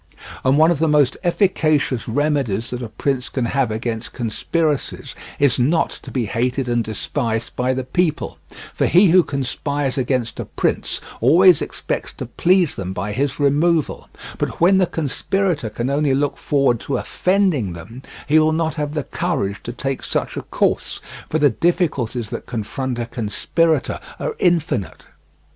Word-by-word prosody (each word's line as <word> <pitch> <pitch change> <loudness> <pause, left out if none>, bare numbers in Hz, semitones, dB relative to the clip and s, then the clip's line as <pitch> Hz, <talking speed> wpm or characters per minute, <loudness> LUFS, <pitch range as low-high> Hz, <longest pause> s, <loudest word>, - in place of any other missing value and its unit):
And 130 +2 +3
one 160 +2 +6
of 165 - 0
the 160 - +2
most 150 -3 +3
efficacious 155 - +1
remedies 130 -4 0
that 125 0 -4
a 120 - -5
prince 130 +3 -2
can 130 -3 -1
have 130 0 +1
against 110 +1 -4
conspiracies 145 +6 -2 0.2
is 140 -3 +3
not 155 +7 +2
to - - -10
be 125 -4 -1
hated 125 +5 -1
and 120 -1 +1
despised 115 +1 -3
by 125 +1 0
the 130 - -2
people, 155 +4 -1 0.3
for - - +1
he 180 +2 +6
who 180 +2 +7
conspires 140 -1 -2
against 125 -2 -1
a - - -3
prince - - -1 0.2
always 175 +7 +6
expects - - -4
to - - -6
please 180 -3 +2
them 95 -1 -4
by 100 +3 -3
his 135 +5 -1
removal; 150 +3 +1 0.3
but - - -3
when 185 +3 +5
the 185 -2 +3
conspirator 165 - -1
can 120 +3 -3
only 140 -1 +2
look 145 +1 0
forward 135 -5 +1
to 140 - -2
offending 180 - +1
them, 115 +10 -10 0.3
he 155 +2 +5
will 155 0 +3
not 160 -1 0
have 150 -1 -3
the 150 - -1
courage 110 - -2
to 120 - -6
take 135 +2 -3
such - - -2
a - - -3
course, - - -1 0.3
for 155 - +1
the 145 -3 +4
difficulties 130 - 0
that - - -6
confront 120 +3 -3
a 120 - -2
conspirator 130 - 0 0.2
are - - -3
infinite. 165 - 0
140 Hz, 165 wpm, -20 LUFS, 120-160 Hz, 0.3 s, who